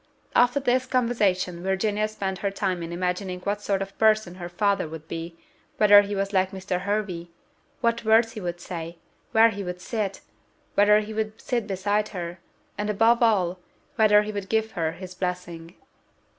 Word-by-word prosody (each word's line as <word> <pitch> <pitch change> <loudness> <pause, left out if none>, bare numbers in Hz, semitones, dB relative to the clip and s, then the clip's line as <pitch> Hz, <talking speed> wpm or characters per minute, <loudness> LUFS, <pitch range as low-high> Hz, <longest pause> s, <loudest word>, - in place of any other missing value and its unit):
After 245 +3 +4
this 255 -1 +1
conversation 205 -9 +1
Virginia 205 +3 0
spent 195 -3 -4
her 200 - 0
time 195 -2 -2
in 165 0 -5
imagining 180 +1 -2
what 205 +2 -2
sort 195 -1 0
of 195 0 -11
person 215 -4 +3
her 175 - -5
father 200 0 +1
would 160 0 -9
be; 165 +1 -6 0.4
whether 205 -1 +8
he 205 0 -4
was 195 +1 -2
like 190 -1 +3
Mr. 190 -1 -3
Hervey; 200 -4 -2 0.5
what 235 0 +1
words 225 +1 +4
he 215 - -7
would 175 -1 -4
say; 170 -1 -6 0.3
where 225 +1 +6
he 200 -2 -5
would 180 -1 -5
sit; 205 0 -3 0.5
whether 210 +1 +5
he 215 +1 -7
would 215 0 -3
sit 235 -4 -2
beside 205 +2 0
her; 175 0 -5 0.4
and, 210 0 -1
above 225 +3 +3
all, 190 -6 +2 0.4
whether 210 -2 +5
he 215 - -4
would 200 -2 -5
give 220 0 +1
her 165 -4 -2
his 185 +1 -9
blessing. 180 -2 -5
200 Hz, 175 wpm, -25 LUFS, 180-215 Hz, 0.5 s, whether